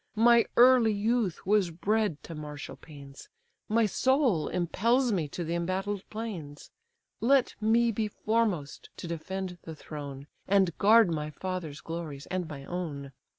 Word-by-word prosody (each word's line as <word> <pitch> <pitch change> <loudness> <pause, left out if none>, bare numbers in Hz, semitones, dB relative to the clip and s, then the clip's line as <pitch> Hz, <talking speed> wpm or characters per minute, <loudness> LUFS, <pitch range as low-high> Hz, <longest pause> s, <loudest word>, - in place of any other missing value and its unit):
My 235 +1 +5
early 245 -3 +6
youth 220 -3 0
was 200 -2 +3
bred 195 0 -1
to 165 - -8
martial 150 -2 -7
pains, 140 -3 -13 0.4
My 225 +1 +3
soul 255 - +2
impels 230 +8 +1
me 170 -7 0
to 175 +5 -5
the 165 +1 -3
embattled 190 +3 -2
plains! 185 -10 -7 0.5
Let 265 +2 +3
me 230 +2 +3
be 220 0 -1
foremost 210 -9 -1
to - - -7
defend 180 +2 -5
the 160 - -8
throne, 140 -3 -8 0.2
And 190 -3 +3
guard 220 -2 +6
my 150 -1 -2
father's 165 -1 -5
glories, 160 -4 -6
and 185 -2 -2
my 140 -2 -8
own. 145 -6 -5
185 Hz, 145 wpm, -29 LUFS, 155-220 Hz, 0.5 s, early